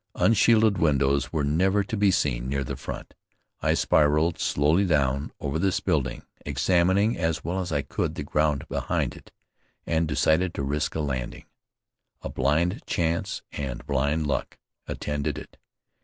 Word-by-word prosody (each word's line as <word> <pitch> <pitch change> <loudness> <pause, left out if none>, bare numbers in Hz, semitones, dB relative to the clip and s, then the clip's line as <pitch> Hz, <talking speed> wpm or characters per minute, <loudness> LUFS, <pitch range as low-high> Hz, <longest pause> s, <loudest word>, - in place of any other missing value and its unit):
Unshielded 110 -2 +4
windows 70 -3 +2
were 80 -3 0
never 95 +8 +2
to 110 - -4
be 100 -1 +3
seen 65 -8 0
near 70 0 -1
the - - -5
front. - - -7 0.5
I - - +2
spiraled 75 +3 +2
slowly 75 +7 +2
down 70 -5 +1
over 70 +3 -2
this 95 +1 +1
building, 70 -9 -1 0.2
examining, 95 +4 +2
as 80 -1 -1
well 90 +4 -2
as 90 -2 -3
I 70 -2 0
could, 70 - -3
the - - -4
ground 75 -2 0
behind - - -1
it, - - -15 0.5
and 80 0 +1
decided 85 +4 +2
to 70 - -2
risk 75 +3 -1
a 80 - 0
landing. 65 -4 -4 0.8
A - - -4
blind 80 - +1
chance 85 0 -1
and 65 -4 -5
blind 70 +3 0
luck 75 - -2 0.3
attended 75 0 -3
it. - - -10
75 Hz, 155 wpm, -26 LUFS, 70-90 Hz, 0.8 s, Unshielded